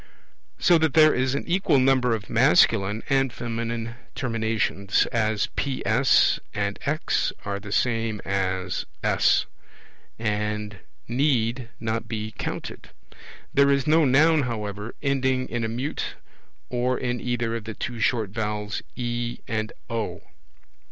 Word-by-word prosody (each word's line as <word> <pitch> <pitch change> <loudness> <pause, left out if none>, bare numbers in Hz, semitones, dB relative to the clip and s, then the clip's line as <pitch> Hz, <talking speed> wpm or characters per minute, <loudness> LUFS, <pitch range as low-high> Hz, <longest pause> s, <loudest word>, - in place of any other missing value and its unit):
So 175 -2 +5
that 160 -3 +1
there 155 -1 +7
is 130 +1 0
an 140 - -2
equal 175 -4 +2
number 130 -2 +3
of 100 -4 -7
masculine 105 0 +3
and 135 -1 +2
feminine 115 0 -4 0.2
terminations, 110 -4 0
as 110 -2 +1
PS 130 -2 +3 0.2
and 100 0 -1
X 155 +3 0
are 100 -1 -2
the 105 0 -9
same 115 -2 0
as 95 -1 -1 0.2
S, - - +3 0.7
and 105 -1 -2 0.3
need 120 -2 +1
not 115 0 -2
be 110 -1 -4
counted. - - -6 0.6
There 140 0 +5
is 140 -2 +2
no 160 +1 +4
Noun, 150 +4 +5
however, 105 -3 -4
ending 130 -2 +1
in 120 0 -2
a - - 0
mute 130 +6 -3 0.5
or 125 +1 0
in 125 -1 -2
either 120 -2 -1
of 115 -2 -5
the 110 -1 -6
two 120 -1 -5
short 110 -2 +1
vowels, 105 -1 -3
E 120 -1 -3
and 110 -3 -2 0.2
O. 105 -7 -4
115 Hz, 130 wpm, -25 LUFS, 105-130 Hz, 0.7 s, there